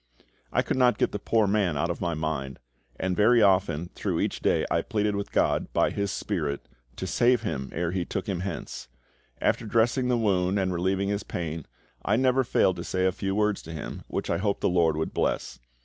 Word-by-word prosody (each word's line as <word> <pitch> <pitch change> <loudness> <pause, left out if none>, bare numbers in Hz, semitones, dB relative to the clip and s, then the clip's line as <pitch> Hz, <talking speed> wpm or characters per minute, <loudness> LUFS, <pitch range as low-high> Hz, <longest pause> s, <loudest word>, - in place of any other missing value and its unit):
I - - +2
could - - -1
not 125 -1 +4
get - - +1
the 105 - -3
poor 110 +1 +2
man 100 -6 +1
out 85 +5 0
of 85 - -6
my 85 -1 -1
mind, 75 -4 -3 0.4
and 95 -1 0
very 110 +3 +5
often 90 -4 +2
through - - -2
each - - -1
day - - +2
I - - +2
pleaded 105 -1 -1
with 100 0 -4
GOD, - - +1
by - - +2
His 100 -1 -2
SPIRIT, 80 - -3 0.3
to - - -4
save 120 -1 +3
him 65 - -3
ere 85 0 -2
He 90 -1 -1
took 95 +2 -4
him 95 -4 -1
hence. 90 -7 -5 0.5
After 115 - 0
dressing 120 +4 +2
the 125 -1 +2
wound 95 -3 +1
and 95 -2 0
relieving 95 +3 0
his 100 0 -1
pain, 80 -3 -5 0.4
I 105 - +2
never 130 +2 +3
failed 95 -6 +2
to 85 - -4
say 95 0 0
a 95 - +3
few 95 +1 -3
words 105 -1 +1
to 80 - -9
him, 80 - -6
which - - -3
I - - +1
hoped 100 0 -1
the - - +2
LORD 85 -3 +2
would 80 - -2
bless. - - -1
95 Hz, 215 wpm, -27 LUFS, 85-105 Hz, 0.5 s, very